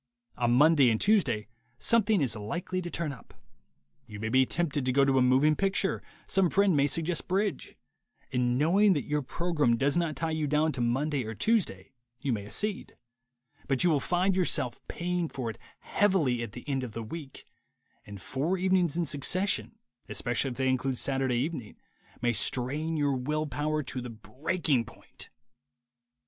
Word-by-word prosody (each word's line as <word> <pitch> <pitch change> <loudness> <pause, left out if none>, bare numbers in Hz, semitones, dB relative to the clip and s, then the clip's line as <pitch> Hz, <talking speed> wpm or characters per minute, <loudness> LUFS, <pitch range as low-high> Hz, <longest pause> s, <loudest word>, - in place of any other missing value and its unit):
On 120 -1 0
Monday 145 0 +6
and 110 -1 +1
Tuesday 195 - +2 0.3
something 220 - +2
is 120 -5 -1
likely 175 - -3
to 175 - -5
turn 170 -3 -2
up 125 - -15 0.4
— 70 -1 -44
you 105 -2 -9
may 110 +1 -3
be 130 +2 +4
tempted 155 -5 -1
to 130 - +1
go 140 +2 +4
to 135 -1 +3
a - - +3
moving 130 +5 +4
picture, 195 +1 0 0.2
some 190 -2 +2
friend 195 -2 +3
may 140 0 +3
suggest 165 +3 -2
bridge 195 +2 -1 0.3
— - - -39
and 125 0 +1
knowing 190 +8 +4
that 145 - -1
your 150 0 0
program 150 -4 0
does 140 +4 +1
not 170 -3 0
tie 160 +3 -2
you 155 -1 -1
down 150 +2 +2
to 130 - -4
Monday 135 +4 0
or 110 0 -6
Tuesday, 135 - 0 0.3
you 130 0 -1
may 100 -2 -4
accede; 210 - -2 0.7
but 135 +1 +2
you 175 - +4
will 150 - +3
find 180 +6 +1
yourself 170 -9 0
paying 175 -1 -2
for 120 -4 -4
it - - -15 0.2
heavily 170 -12 +1
at 115 -3 -6
the 120 +3 -10
end 135 -2 -1
of 120 -4 -6
the 115 - -5
week; 140 +3 -9 0.6
and 100 -1 -10
four 150 - -1
evenings 185 -3 +1
in 175 - +1
succession, 185 +10 -1 0.3
especially 120 +2 -1
if 120 - -7
they 130 0 0
include 130 0 0
Saturday 135 -2 0
evening, 130 -4 -3 0.5
may 120 0 +2
strain 145 +9 0
your 145 -2 +1
will 150 +5 -1
power 150 +1 -2
to 130 -1 -5
the 125 - -6
breaking 130 +4 -1
point. - - -12
145 Hz, 180 wpm, -29 LUFS, 125-175 Hz, 0.7 s, Monday